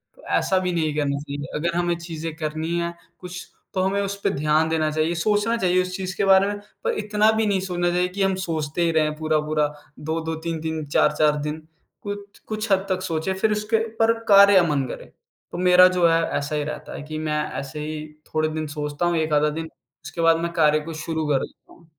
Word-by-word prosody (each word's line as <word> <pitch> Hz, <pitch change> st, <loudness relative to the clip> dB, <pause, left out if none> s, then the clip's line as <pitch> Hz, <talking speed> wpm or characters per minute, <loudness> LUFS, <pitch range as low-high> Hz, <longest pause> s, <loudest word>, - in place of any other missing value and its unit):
तो -, -, -19 dB
ऐसा 190 Hz, -, +1 dB
भी 180 Hz, -1 st, -1 dB
नहीं 155 Hz, -3 st, 0 dB
करना 140 Hz, -2 st, 0 dB
चाहिए। 145 Hz, -1 st, -6 dB
अगर 170 Hz, +2 st, -1 dB
हमें 175 Hz, 0 st, +1 dB
चीज़ें 165 Hz, -2 st, -6 dB
करनी 160 Hz, +1 st, -3 dB
हैं 170 Hz, 0 st, -2 dB, 0.3 s
कुछ, 180 Hz, 0 st, -8 dB, 0.3 s
तो 185 Hz, -, 0 dB
हमें 195 Hz, +2 st, +1 dB
उस 200 Hz, 0 st, -2 dB
पे -, -, +2 dB
ध्यान 155 Hz, +2 st, +1 dB
देना 155 Hz, -1 st, +1 dB
चाहिए, 155 Hz, +2 st, 0 dB
सोचना 210 Hz, +6 st, +1 dB
चाहिए 185 Hz, -2 st, +2 dB
उस 185 Hz, 0 st, -4 dB
चीज़ 185 Hz, -1 st, -4 dB
के -, -, +1 dB
बारे 195 Hz, +1 st, +6 dB
में 205 Hz, 0 st, -3 dB, 0.2 s
पर -, -, +1 dB
इतना 210 Hz, +1 st, +3 dB
भी 220 Hz, 0 st, +1 dB
नहीं 195 Hz, -2 st, +2 dB
सोचना 175 Hz, -2 st, -1 dB
चाहिए 180 Hz, +1 st, +1 dB
कि 195 Hz, +2 st, -5 dB
हम 190 Hz, -1 st, +2 dB
सोचते 160 Hz, 0 st, -2 dB
ही 165 Hz, -1 st, +3 dB
रहें 155 Hz, -1 st, +1 dB
पूरा-पूरा 155 Hz, -1 st, +1 dB, 0.3 s
2-2, 160 Hz, +1 st, -3 dB
3-3, 160 Hz, -1 st, -4 dB
4-4 150 Hz, +1 st, +3 dB
दिन 150 Hz, +1 st, -4 dB, 0.4 s
कुछ 205 Hz, 0 st, -7 dB
कुछ 215 Hz, 0 st, -3 dB
हद 195 Hz, 0 st, +3 dB
तक 185 Hz, 0 st, 0 dB
सोचें, 165 Hz, +2 st, -1 dB
फिर 210 Hz, +3 st, +1 dB
उसके 210 Hz, +2 st, +1 dB
ऊपर 225 Hz, +1 st, +2 dB, 0.2 s
कार्य 200 Hz, 0 st, +8 dB
अमन 150 Hz, -6 st, +3 dB
करें। -, -, -8 dB, 0.4 s
तो -, -, -5 dB
मेरा 180 Hz, 0 st, +7 dB
जो 170 Hz, -1 st, +5 dB
है, 165 Hz, 0 st, +3 dB, 0.2 s
ऐसा 145 Hz, +2 st, -3 dB
ही 150 Hz, -, 0 dB
रहता 150 Hz, 0 st, -6 dB
है -, -, -7 dB
कि 155 Hz, +1 st, -6 dB
मैं 150 Hz, 0 st, 0 dB, 0.2 s
ऐसे 140 Hz, +2 st, -7 dB
ही 155 Hz, 0 st, -4 dB, 0.3 s
थोड़े 155 Hz, 0 st, +1 dB
दिन 155 Hz, 0 st, -3 dB
सोचता 150 Hz, +2 st, -3 dB
हूँ, 175 Hz, -1 st, +1 dB
1 155 Hz, -1 st, 0 dB
आधा 150 Hz, +1 st, +3 dB
दिन 160 Hz, +2 st, -4 dB, 0.4 s
उसके 160 Hz, +1 st, -5 dB
बाद 165 Hz, 0 st, +5 dB
मैं 170 Hz, 0 st, -2 dB
कार्य 155 Hz, -2 st, +4 dB
को 160 Hz, +2 st, -7 dB
शुरू 160 Hz, -2 st, -2 dB
कर 140 Hz, -2 st, +2 dB
देता -, -, -21 dB
हूँ। 170 Hz, -2 st, -21 dB
165 Hz, 220 wpm, -23 LUFS, 155-185 Hz, 0.4 s, कार्य